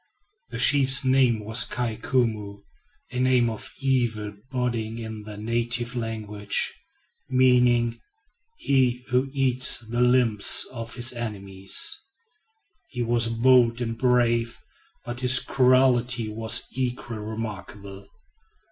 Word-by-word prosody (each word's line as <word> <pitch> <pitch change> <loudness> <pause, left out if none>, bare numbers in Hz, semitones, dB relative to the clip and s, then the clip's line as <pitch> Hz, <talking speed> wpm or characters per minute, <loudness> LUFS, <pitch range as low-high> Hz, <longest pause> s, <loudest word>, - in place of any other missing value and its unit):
The - - -7
chief's 135 -1 +5
name 130 -5 +2
was 110 +2 +1
"Kai 120 -2 -3
Koumou," 105 -6 -2 0.5
a 125 - -4
name 125 -2 +2
of 110 - -7
evil 120 -6 -1 0.2
boding 120 -3 -3
in 110 -2 -7
the 105 0 -10
native 120 +3 -2
language, 105 -3 -3 0.6
meaning 125 -2 +2 0.6
"He 125 -2 0
who 130 +2 0
eats 130 -2 +3
the 120 +1 -4
limbs 125 -4 +2
of 115 -2 -8
his 120 0 -4
enemy." 100 -5 -8 1.2
He 125 -2 -4
was 115 0 +3
bold 120 0 +3
and 115 -2 -3
brave, 120 -1 +1 0.5
but 120 0 -6
his 125 0 +6
cruelty 125 -3 +2
was 110 +2 -1
equally 125 -3 -4
remarkable. 105 -2 -8
120 Hz, 110 wpm, -24 LUFS, 110-125 Hz, 1.2 s, his